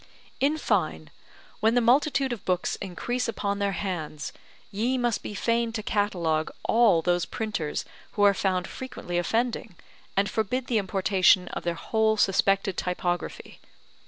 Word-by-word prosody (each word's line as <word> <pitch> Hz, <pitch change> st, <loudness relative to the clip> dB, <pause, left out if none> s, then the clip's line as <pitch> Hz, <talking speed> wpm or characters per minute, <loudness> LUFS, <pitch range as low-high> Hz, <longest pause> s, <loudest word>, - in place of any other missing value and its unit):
In 290 Hz, +3 st, +2 dB
fine, 155 Hz, -, -1 dB, 0.5 s
when 225 Hz, +2 st, +3 dB
the -, -, +5 dB
multitude 270 Hz, +2 st, +3 dB
of 225 Hz, -, -8 dB
books 180 Hz, -1 st, 0 dB
increase 240 Hz, +7 st, -3 dB
upon 200 Hz, -3 st, -2 dB
their 200 Hz, -1 st, 0 dB
hands, 170 Hz, -6 st, -4 dB, 0.4 s
ye 235 Hz, +6 st, 0 dB
must 240 Hz, -3 st, 0 dB
be 210 Hz, -, -6 dB
fain 230 Hz, +2 st, +1 dB
to 215 Hz, -2 st, -3 dB
catalogue 175 Hz, -8 st, 0 dB
all 225 Hz, -8 st, +4 dB
those 175 Hz, -1 st, +1 dB
printers 215 Hz, -10 st, -3 dB, 0.3 s
who 205 Hz, -, +1 dB
are 200 Hz, -1 st, +7 dB
found 185 Hz, -2 st, 0 dB
frequently 175 Hz, -9 st, -4 dB
offending, 225 Hz, +1 st, -1 dB, 0.4 s
and 200 Hz, +1 st, +3 dB
forbid 235 Hz, +5 st, -1 dB
the 235 Hz, -4 st, +1 dB
importation 190 Hz, -2 st, +3 dB
of -, -, -4 dB
their 170 Hz, -1 st, -2 dB
whole 220 Hz, +4 st, +1 dB
suspected 195 Hz, -1 st, +2 dB
typography. 180 Hz, -1 st, -3 dB
200 Hz, 145 wpm, -26 LUFS, 180-230 Hz, 0.5 s, are